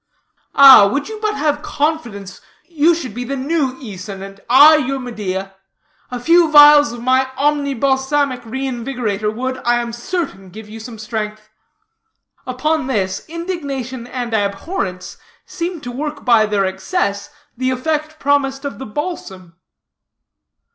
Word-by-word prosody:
Ah, 270 -7 +9
would 280 +5 -2
you 435 -1 -7
but 425 -1 -1
have 295 0 -1
confidence, 240 -13 -3 0.3
you 330 0 +2
should 260 -9 -6
be 245 +3 -5
the 275 +3 -4
new 275 0 -1
Æson, 195 -5 -8
and 195 0 -13
I 290 +5 +8
your 275 -2 -2
Medea. 200 -6 -5 0.6
A 250 - -5
few 335 +4 +4
vials 295 -3 +8
of 235 0 -8
my 260 +1 +2
Omni 285 -1 0
Balsamic 265 0 0
Reinvigorator 240 -3 -3
would, 255 +3 -4
I 240 0 +1
am 235 -1 -4
certain, 235 - -5
give 215 +3 -11
you 220 +1 -10
some 225 0 -9
strength." 215 -1 -5 1.0
Upon 280 +3 -1
this, 190 -7 -2
indignation 280 -8 -5
and 245 -2 -5
abhorrence 200 - -3 0.3
seemed 340 -3 -5
to 245 - -5
work 290 +3 -5
by 230 -4 +4
their 205 -2 0
excess 200 - -2 0.3
the 255 +1 -1
effect 305 +4 -2
promised 275 -1 0
of 280 - -5
the 265 - -7
balsam. 195 - -6
260 Hz, 140 wpm, -18 LUFS, 215-295 Hz, 1.0 s, Ah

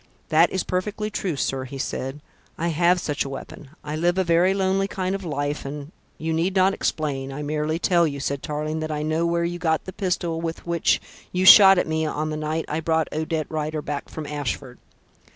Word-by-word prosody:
"That 165 +2 +5
is 190 - -1
perfectly 210 +3 -2
true, 190 -6 -2
sir," 135 -1 -1
he 135 +1 -8
said. 135 +2 -4 0.4
"I 170 +1 -1
have 175 +3 +3
such 150 -4 -1
a 140 - -6
weapon. 135 +1 -8
I 150 +1 -4
live 175 +3 +1
a 190 - +3
very 170 +2 +3
lonely 195 0 +1
kind 190 -1 -2
of 195 0 -4
life, 145 -2 -2
and 145 +2 -7
" - - -38
"You 160 - +1
need 175 +4 0
not 190 +1 +4
explain. 135 -7 -2
I 145 +2 -5
merely 150 +2 -1
tell 170 -1 +3
you," 140 -2 -4
said 140 0 -2
Tarling, 155 +1 -3
"that 155 0 -3
I 150 0 -2
know 160 +2 0
where 170 0 +1
you 175 +1 -3
got 160 -2 0
the 185 - -7
pistol 175 -4 -1
with 165 0 -4
which 170 -1 +2 0.3
you 180 +1 0
shot 195 -1 +10
at - - +2
me 160 0 -1
on 155 +1 -2
the - - -2
night 155 +1 -2
I 155 - -2
brought 160 0 0
Odette 155 0 -1
Rider 155 -1 -3
back 145 -1 -4
from 155 - -6
Ashford." 140 -3 -4
160 Hz, 220 wpm, -24 LUFS, 150-175 Hz, 0.4 s, shot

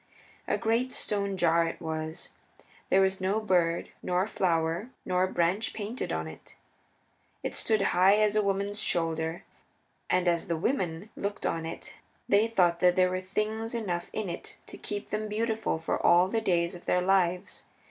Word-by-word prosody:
A - - +1
great 235 +3 0
stone 200 -4 -1
jar 170 -1 +3
it - - -5
was; 160 -1 -5 0.6
there 190 - +5
was 190 0 +1
no 195 +3 +1
bird, 175 -5 +1
nor 180 +1 +1
flower, 170 +1 0 0.2
nor 185 0 +2
branch 185 +5 0
painted 220 +3 -4
upon 80 0 -2
it. 80 - -12 0.9
It - - -3
stood 215 -3 +1
high 185 +3 +6
as 215 0 +2
a 215 - +4
woman's 200 +1 -1
shoulder. 165 0 -1 0.7
And 180 0 +2
as 170 -1 +1
the 170 - -1
women 185 - -2
looked 200 +1 -4
on 165 -1 -1
it - - -8 0.3
they 205 +3 +4
thought 175 -6 +2
that 180 0 +4
there 185 0 +3
were 185 0 -2
things 215 +4 -2
enough 180 -7 -3
in 215 -2 -3
it 170 - -7
to - - -10
keep 205 -1 -5
them 215 +1 -2
beautiful 220 -2 -1
for 160 - -2
all 175 +1 +6
the 225 +3 -1
days 175 -4 +1
of 175 - -11
their 180 0 +2
lives. 180 -2 +1
185 Hz, 170 wpm, -29 LUFS, 170-210 Hz, 0.9 s, high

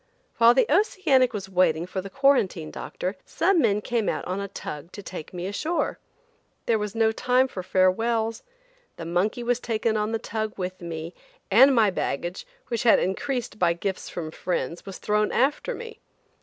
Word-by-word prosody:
While 235 +1 +6
the 265 - +5
Oceanic 300 - +3
was 200 -4 -5
waiting 175 -3 +2
for 185 +1 -4
the 195 - -8
quarantine 230 - +2
doctor, 185 +3 -5
some 360 +1 +2
men 210 -6 +2
came 230 -1 0
out - - -3
on 185 +2 -3
a 200 - -4
tug 165 -4 -7
to 205 - -8
take 180 -4 -8
me 180 -1 -5
ashore. 310 - -2 0.7
There 225 -2 +2
was 210 +1 -4
no 225 -1 +3
time 250 +3 +2
for 190 - -6
farewells. 220 +5 +1 0.6
The 165 - -6
monkey 185 +8 0
was 245 0 +1
taken 225 -2 -1
on 210 +1 -1
the 225 - 0
tug 220 -1 -4
with 185 -1 -4
me, 165 0 -6 0.4
and 265 +6 +7
my 215 -4 +4
baggage, 175 +1 -3 0.2
which 235 -2 -1
had 235 - +6
increased 240 +3 -2
by 170 -1 +3
gifts 190 +2 -4
from 160 -3 -5
friends, 175 +1 -3
was 195 - -6
thrown 210 0 +1
after 275 +4 +1
me. 460 -1 -9
210 Hz, 180 wpm, -25 LUFS, 185-240 Hz, 0.7 s, and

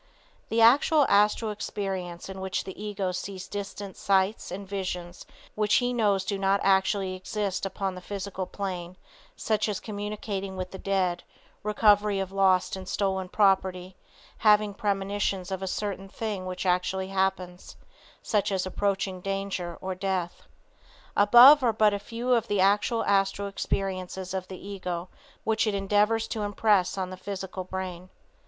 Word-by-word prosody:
The 225 +1 +2
actual 280 +5 +6
Astral 210 +2 +3
experience 190 -4 -4
in 190 0 -7
which 190 -1 -2
the 190 +1 -9
ego 200 -3 -2
sees 185 +1 -6
distant 200 -1 -6
sights, 195 +2 +1
sights - - -9
and 195 +2 -6
visions 180 -3 -5 0.3
which 210 -1 +2
he 245 0 +2
knows 205 -5 +2
do 200 -2 -2
not 195 +1 +2
actually 190 0 +2
exist 195 +1 -3
upon 195 0 -3
the 180 - -9
physical 190 -1 -5
plane, 185 -3 -5 0.4
such 215 -1 0
as 205 - -2
communicating 205 -2 -5
with 185 0 -4
the 190 - -8
dead, 185 -3 0 0.4
recovery 210 -1 +3
of 190 -1 -3
lost 195 -2 +2
and 185 -1 -8
stolen 190 -2 -1
property; 190 -2 +1 0.4
having 210 -1 +4
premonitions 195 -2 -1
of 190 0 -3
a 190 - -3
certain 195 0 -3
thing 205 -3 -4
which 185 +1 -4
actually 185 +1 0
happens, 190 -2 -2 0.5
such 205 -1 0
as 190 -1 0
approaching 190 -1 -1
danger 195 -3 -3
or 190 0 -3
death. 185 -2 -3 0.7
Above 245 +8 +9
are 240 -3 +3
but 215 -1 +4
a 200 - -1
few 235 +4 -4
of 230 -1 +2
the 205 - 0
actual 205 +4 +2
astral 195 0 +1
experiences 190 -1 -3
of 185 -1 -3
the 190 - -8
ego 180 -3 -4 0.3
which 220 0 +1
it 210 - 0
endeavors 210 +3 +2
to 220 - -4
impress 205 -2 +2
on 185 -1 -3
the 185 - -7
physical 190 -1 -5
brain. 185 -1 -6
195 Hz, 155 wpm, -27 LUFS, 185-205 Hz, 0.7 s, Above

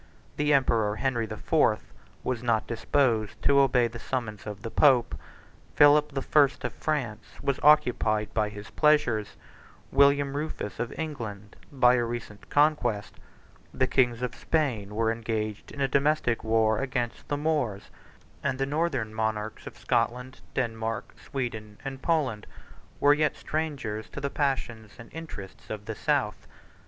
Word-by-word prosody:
The 150 0 +2
emperor 115 -7 +3
Henry 120 -1 -1
the - - -6
Fourth - - +1 0.3
was 125 -3 -2
not 115 -3 +1
disposed 115 -3 0
to 140 0 +5
obey 125 -3 +4
the 115 0 -9
summons 110 -5 -4
of 105 -1 -7
the 115 - -5
pope: 130 -2 +4 0.6
Philip 150 0 +6
the 135 -1 -2
First 145 -3 +3
of - - -3
France 125 -9 -2 0.2
was 140 -1 -1
occupied 120 -8 +3
by 105 -1 +1
his 105 +1 -10
pleasures; 135 -9 +2 0.6
William 140 0 +4
Rufus 145 -10 -4
of 120 - -2
England 110 -10 -6 0.2
by 125 -3 +5
a 120 -1 +2
recent 115 -3 -6
conquest; 145 -10 +2 0.6
the 130 - +1
kin`gs 125 -2 +1
of 125 -1 -2
Spain 115 -11 -1
were 110 0 +2
engaged 110 -2 -3
in 140 - -6
a 135 - +3
domestic 140 -3 +1
war 110 -1 +2
against 125 -3 -3
the 145 - -1
Moors; 145 -10 -1 0.5
and - - -1
the 135 - 0
northern 140 -7 -1
monarchs 110 -1 -3
of - - -9
Scotland, 125 +2 -1
Denmark, 115 -4 -2
42 - - -20
Sweden, 110 -6 -4
and 135 -1 -5
Poland, 140 -11 0 0.5
were 145 0 +6
yet 150 0 +1
strangers 140 -9 -3
to - - -7
the 140 0 -3
passions 120 -6 -2
and 115 - -13
interests 110 -13 -9
of 105 -1 -6
the 110 - -4
South. 135 -4 -1
120 Hz, 150 wpm, -27 LUFS, 110-140 Hz, 0.6 s, Philip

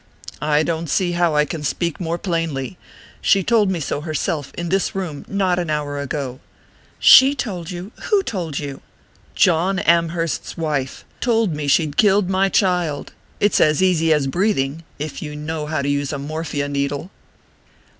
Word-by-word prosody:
"I 150 +1 +2
don't 165 -1 -2
see 180 +4 +1
how 175 -2 +1
I 150 0 +4
can 160 0 -5
speak 170 +4 -2
more 170 -1 -2
plainly. 165 -6 -2 0.5
She 195 -1 +3
told 215 -1 +3
me 185 -3 -1
so 145 -1 -3
herself, 155 -2 -2
in 175 0 -3
this 195 +2 0
room, 170 -7 -4
not 190 -3 +1
an 175 -2 -3
hour 145 -2 -2
ago." 140 -2 -4 0.6
"She 270 +2 +8
told 185 - -4
you? 180 +3 -7
Who 410 -3 +2
told 170 - -4
you?" 140 -2 -5 0.5
"John 180 +2 +3
Amherst's 170 -3 0
wife. 150 -5 -2
Told 225 -6 +1
me 150 -1 -4
she'd 150 0 +2
killed 200 -2 +4
my 195 +1 +2
child. 180 -8 0 0.3
It's 205 -1 +3
as 155 +4 +3
easy 165 -3 +3
as 150 -3 +3
breathing 160 -2 0
if 150 0 -5
you 150 -1 -6
know 150 0 -4
how 155 -2 -1
to - - -2
use 145 -1 0
a 145 - -3
morphia 145 0 -3
needle." 140 +4 -2
165 Hz, 165 wpm, -20 LUFS, 150-185 Hz, 0.6 s, She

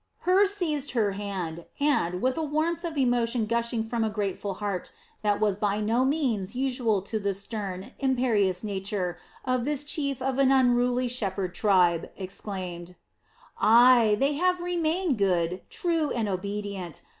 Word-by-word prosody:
Hur 380 +3 +4
seized 315 -9 -1
her 215 -5 +2
hand 190 -5 -5
and, 185 - +1
with 255 0 +2
a 325 - -2
warmth 315 +3 -1
of 330 -3 -4
emotion 240 -3 +1
gushing 235 0 0
from 230 0 -2
a 220 - +1
grateful 200 -1 -3
heart 200 -3 -4 0.3
that 205 -1 +1
was 210 -3 +1
by 205 0 0
no 225 +4 +1
means 250 -8 0
usual 245 -6 0
to 220 +2 -3
the 200 -1 -1
stern, 195 -2 -6
imperious 230 -9 +1
nature 195 -3 -3 0.3
of 255 -1 0
this 290 +1 -1
chief 280 -3 -2
of 265 +1 -1
an 270 -1 +4
unruly 250 -1 +3
shepherd 195 -6 -2
tribe, 180 -5 +2
exclaimed: 185 -2 -6 0.6
"Ay, 235 -1 +6
they 275 +2 +2
have 360 +4 +1
remained 345 - 0
good, 180 -2 +1
true, 330 -4 0
and 230 -4 -1
obedient. 200 -2 -4
225 Hz, 150 wpm, -27 LUFS, 195-270 Hz, 0.6 s, Ay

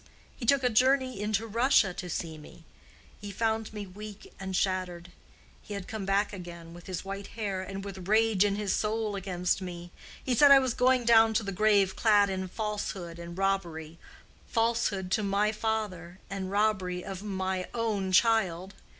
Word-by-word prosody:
He 235 - -6
took 280 +1 +4
a 250 - +3
journey 255 -1 +2
into 210 +1 0
Russia 225 -3 +3
to 180 0 -6
see 165 -1 -4
me; 155 +2 -14 0.6
he 205 - -7
found 220 +1 -1
me 210 -1 -6
weak 205 +2 -11
and 190 -1 -4
shattered. 180 -2 -1 0.5
He 205 - -7
had 195 -2 -6
come 215 -3 -5
back 200 +2 +1
again, 170 -3 -9
with 175 0 -13
his 185 0 -5
white 195 +1 -6
hair, 200 -4 -2
and 195 +1 -6
with 190 -2 -8
rage 215 -1 +4
in 200 -1 +1
his 205 -2 -1
soul 215 -1 -1
against 180 -1 -1
me. 175 -1 -7 0.3
He 255 - 0
said 285 +4 +6
I 280 - +10
was 260 -3 +1
going 255 0 +3
down 225 -1 +5
to 220 - +2
the 200 - -4
grave 200 -1 +3
clad 205 -3 +4
in 190 0 -3
falsehood 195 -4 -4
and 170 +1 -8
robbery—falsehood 195 +4 -2
to 215 - +2
my 205 +1 +1
father 210 -6 -3
and 195 -1 -4
robbery 190 -3 0
of 195 -1 -6
my 190 -2 -3
own 210 -5 -1
child. 190 -3 +2
200 Hz, 175 wpm, -29 LUFS, 185-220 Hz, 0.6 s, I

